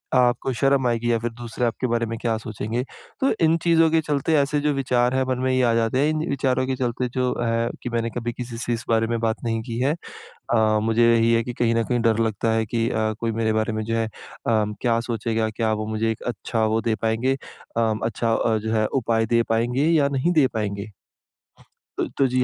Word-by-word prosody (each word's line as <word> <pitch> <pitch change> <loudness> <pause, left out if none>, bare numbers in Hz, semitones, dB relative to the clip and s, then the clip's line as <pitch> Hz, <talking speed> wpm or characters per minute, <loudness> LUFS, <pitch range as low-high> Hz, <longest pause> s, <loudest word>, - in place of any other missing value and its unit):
आपको 125 +1 +2
शर्म 135 -2 +3
आएगी 120 0 0
या 115 - +3
फिर 120 +1 -3
दूसरे 120 +1 -4
आपके 120 +2 -1
बारे 115 0 0
में 115 0 -4
क्या 115 -2 0
सोचेंगे। 110 +2 -3 0.4
तो 270 - +3
इन 160 +1 +3
चीज़ों 165 -1 +4
के 165 - +4
चलते, 150 +1 0
ऐसे 145 +1 +1
जो 150 0 +1
विचार 125 -2 +1
हैं, 130 - +2
मन 130 -1 0
में 130 - +2
ये 130 0 +2
आ 120 -1 +3
जाते 115 +2 +1
हैं। 145 +2 +3
इन 155 +1 -1
विचारों 130 -2 +1
के 130 - 0
चलते 125 0 -1
जो 125 -1 +1
है, 115 0 0
कि 125 - -3
मैंने 115 -1 -1
कभी 120 0 -4
किसी 120 -1 -6
से 120 0 -2
इस 115 - -3
बारे 115 0 +2
में 115 0 -1
बात 115 -1 -1
नहीं 115 -1 -1
की 115 0 -5
है। 135 +4 +2 0.4
अ, 110 -2 +1
मुझे 115 +1 +4
यही 115 0 +3
है 115 0 +3
कि 125 - -4
कहीं 115 -1 +1
न 115 - +2
कहीं 120 +1 0
डर 115 -1 +2
लगता 110 +1 -1
है 110 0 +1
कि 115 +1 0
अ, 110 0 0
कोई 115 -1 -1
मेरे 110 0 0
बारे 110 0 0
में 110 0 -2
जो 115 +1 -2
है 115 0 +1
अ, - - -6 0.4
क्या 110 +1 +1
सोचेगा? 115 -1 -1
क्या 110 0 -1
वो 110 0 -2
मुझे 110 +1 -1
एक 110 - -5
अच्छा 115 -1 -1
वो 110 +1 +1
दे 115 - +1
पाएँगे 115 +4 +1 0.4
अ, 115 -1 +2
अच्छा 115 0 0 0.3
जो 110 0 -2
है, 110 -1 +2
उपाय 115 -2 0
दे 115 +1 +3
पाएँगे 120 +5 +1
या 150 -4 +4
नहीं 140 +5 0
दे 155 -5 +4
पाएँगे? 105 -1 -3 1.1
तो - - 0
तो 135 - +4
जी। 130 0 +1
115 Hz, 235 wpm, -23 LUFS, 115-125 Hz, 1.1 s, चीज़ों